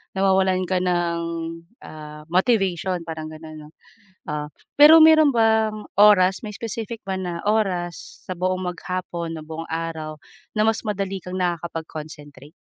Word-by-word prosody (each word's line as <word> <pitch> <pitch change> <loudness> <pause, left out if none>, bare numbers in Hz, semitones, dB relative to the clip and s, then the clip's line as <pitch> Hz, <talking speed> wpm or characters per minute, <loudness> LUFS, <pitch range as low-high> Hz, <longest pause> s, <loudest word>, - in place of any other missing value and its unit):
nawawalan 190 -1 +2
ka 185 -1 +1
ng, 175 -2 0 0.6
ah, 150 0 -10
motivation, 185 -3 +1
parang 160 -1 -5
gano'n 155 0 -10
'no, - - -16 0.6
oo. 150 0 -3 0.3
Pero 315 +2 +10
meron 315 -2 +7
bang 220 -2 +2
oras, 190 -3 +6
may 210 - -6
specific 230 0 -5
ba 190 -1 -3
na 175 -2 -4
oras 185 -5 -2
sa 185 - -3
buong 185 +1 -1
mag-hapon, 175 -2 -5
na 155 - -7
buong 160 +1 -7
araw, 160 -2 -4 0.4
na 215 - +3
mas 225 - +1
madali 195 -2 -3
kang 180 0 -6
nakakapag-concentrate? 155 -4 -5
185 Hz, 135 wpm, -22 LUFS, 165-205 Hz, 0.6 s, Pero